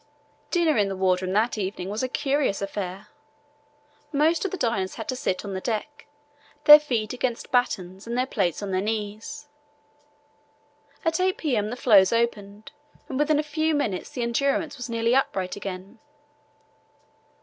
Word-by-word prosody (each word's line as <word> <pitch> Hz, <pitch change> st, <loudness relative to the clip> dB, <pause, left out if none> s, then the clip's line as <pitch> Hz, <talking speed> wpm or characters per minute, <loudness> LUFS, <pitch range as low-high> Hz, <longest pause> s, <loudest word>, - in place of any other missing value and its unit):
Dinner 335 Hz, -5 st, +2 dB
in 205 Hz, -, +3 dB
the 195 Hz, -, -3 dB
wardroom 185 Hz, 0 st, +1 dB
that 220 Hz, +2 st, +1 dB
evening 190 Hz, -2 st, -3 dB
was 210 Hz, +2 st, -3 dB
a 255 Hz, -, -1 dB
curious 275 Hz, -6 st, 0 dB
affair. 200 Hz, 0 st, -5 dB, 1.0 s
Most 310 Hz, +3 st, +2 dB
of 390 Hz, -, -1 dB
the 380 Hz, -, -5 dB
diners 205 Hz, -, -1 dB
had 225 Hz, -, -7 dB
to 255 Hz, -, -1 dB
sit 195 Hz, -6 st, -2 dB
on 200 Hz, -, -5 dB
the 190 Hz, -, -4 dB
deck, 235 Hz, +7 st, -4 dB, 0.6 s
their 300 Hz, 0 st, +11 dB
feet 240 Hz, -8 st, -2 dB
against 245 Hz, -1 st, -3 dB
battens 195 Hz, -6 st, -1 dB
and 235 Hz, +1 st, -2 dB
their 255 Hz, -, +2 dB
plates 195 Hz, -, -1 dB
on 200 Hz, -, -4 dB
their 185 Hz, 0 st, +1 dB
knees. 220 Hz, +7 st, -4 dB, 1.6 s
At 325 Hz, +2 st, +1 dB
8 370 Hz, 0 st, +1 dB
p.m. 230 Hz, -9 st, 0 dB
the 245 Hz, -, -4 dB
floes 205 Hz, -7 st, +5 dB
opened, 220 Hz, 0 st, -2 dB, 0.4 s
and 265 Hz, -, -3 dB
within 300 Hz, 0 st, +3 dB
a 300 Hz, -, +1 dB
few 310 Hz, +1 st, 0 dB
minutes 210 Hz, -11 st, -2 dB
the 245 Hz, -, -4 dB
Endurance 280 Hz, +5 st, 0 dB
was 245 Hz, -3 st, -7 dB
nearly 230 Hz, 0 st, +1 dB
upright 190 Hz, -8 st, 0 dB
again. 195 Hz, +2 st, -7 dB
230 Hz, 160 wpm, -25 LUFS, 200-280 Hz, 1.6 s, their